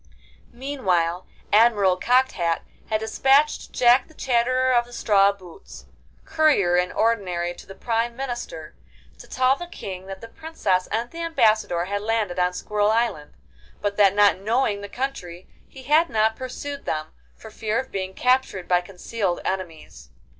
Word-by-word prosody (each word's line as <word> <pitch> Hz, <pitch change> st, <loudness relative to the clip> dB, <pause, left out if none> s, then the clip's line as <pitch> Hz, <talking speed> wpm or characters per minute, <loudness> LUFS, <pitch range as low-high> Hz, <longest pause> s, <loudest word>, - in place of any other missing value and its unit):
Meanwhile 185 Hz, -10 st, -1 dB, 0.3 s
Admiral 210 Hz, -4 st, +4 dB
Cocked 255 Hz, +7 st, +2 dB
Hat 170 Hz, -2 st, -1 dB, 0.3 s
had 215 Hz, -1 st, 0 dB
despatched 270 Hz, +7 st, +2 dB
Jack 245 Hz, +1 st, +4 dB
the 315 Hz, -, -20 dB
Chatterer 255 Hz, 0 st, +1 dB
of 240 Hz, -1 st, +3 dB
the 245 Hz, -, -16 dB
Straw 200 Hz, -4 st, +3 dB
Boots, 185 Hz, -4 st, -14 dB, 0.4 s
Courier 280 Hz, -, +3 dB
in 180 Hz, 0 st, +1 dB
Ordinary 185 Hz, -6 st, 0 dB
to -, -, -14 dB
the 195 Hz, -, -11 dB
Prime 235 Hz, 0 st, -1 dB
Minister, 240 Hz, -11 st, -6 dB, 0.5 s
to -, -, -12 dB
tell 255 Hz, +1 st, +2 dB
the 350 Hz, +4 st, -8 dB
King 190 Hz, -, -8 dB
that 195 Hz, 0 st, -7 dB
the 230 Hz, -, -10 dB
Princess 225 Hz, -, -2 dB
and 230 Hz, +3 st, -3 dB
the 335 Hz, -, -7 dB
Ambassador 220 Hz, -, +1 dB
had 200 Hz, +2 st, -3 dB
landed 215 Hz, -4 st, -1 dB
on 180 Hz, 0 st, +1 dB
Squirrel 210 Hz, +3 st, 0 dB
Island, 220 Hz, -10 st, -1 dB, 0.4 s
but 205 Hz, -1 st, -2 dB
that 200 Hz, -2 st, +5 dB
not 205 Hz, -2 st, +4 dB
knowing 215 Hz, 0 st, 0 dB
the 205 Hz, -, -8 dB
country 190 Hz, -9 st, -5 dB, 0.2 s
he 265 Hz, -, -13 dB
had 310 Hz, +5 st, +3 dB
not 220 Hz, 0 st, +1 dB
pursued 280 Hz, +3 st, -7 dB
them, 155 Hz, 0 st, -3 dB, 0.3 s
for 220 Hz, -, -13 dB
fear 220 Hz, +1 st, -2 dB
of 260 Hz, -, -6 dB
being 190 Hz, -1 st, -4 dB
captured 250 Hz, -7 st, +1 dB
by 180 Hz, -1 st, +3 dB
concealed 190 Hz, +1 st, -3 dB
enemies. 185 Hz, -4 st, -6 dB
215 Hz, 160 wpm, -23 LUFS, 185-255 Hz, 0.5 s, that